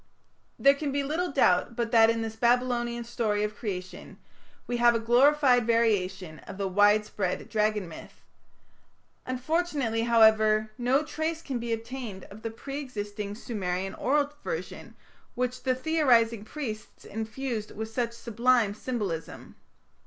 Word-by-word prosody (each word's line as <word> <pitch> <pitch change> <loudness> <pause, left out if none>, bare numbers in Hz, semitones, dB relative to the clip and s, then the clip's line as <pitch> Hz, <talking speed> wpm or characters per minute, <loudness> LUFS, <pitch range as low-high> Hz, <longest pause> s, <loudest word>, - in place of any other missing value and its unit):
There 275 - +6
can 280 0 -3
be 280 +1 0
little 320 +5 -2
doubt 235 -4 +2
but 235 -1 -2
that 225 -2 +6
in 230 0 0
this 225 0 -5
Babylonian 240 0 +1
story 220 -3 -1
of 210 0 -3
Creation 185 -4 -6 0.5
we 245 - -2
have 240 0 +5
a - - +1
glorified 250 +1 +4
variation 190 -8 0
of - - -8
the 200 -1 -1
widespread 205 -1 +2
Dragon 215 -3 0
myth. 165 - -12 1.1
Unfortunately, 260 -3 -1
however, 220 -2 +4
no 255 +5 +1
trace 320 +1 -3
can 260 -4 -3
be 235 0 -4
obtained 225 -3 -5
of 210 +2 -11
the 225 - -3
pre 275 +5 -6
existing 205 -6 -5
Sumerian 195 -4 -3
oral 290 +2 0
version 485 - -6 0.4
which 250 0 -2
the 255 -1 +1
theorizing 245 -7 +2
priests 220 -6 -7
infused 220 +1 -4
with 220 +1 -6
such 235 0 -2
sublime 235 -1 +1
symbolism. 205 -8 -5
230 Hz, 140 wpm, -28 LUFS, 215-255 Hz, 1.1 s, There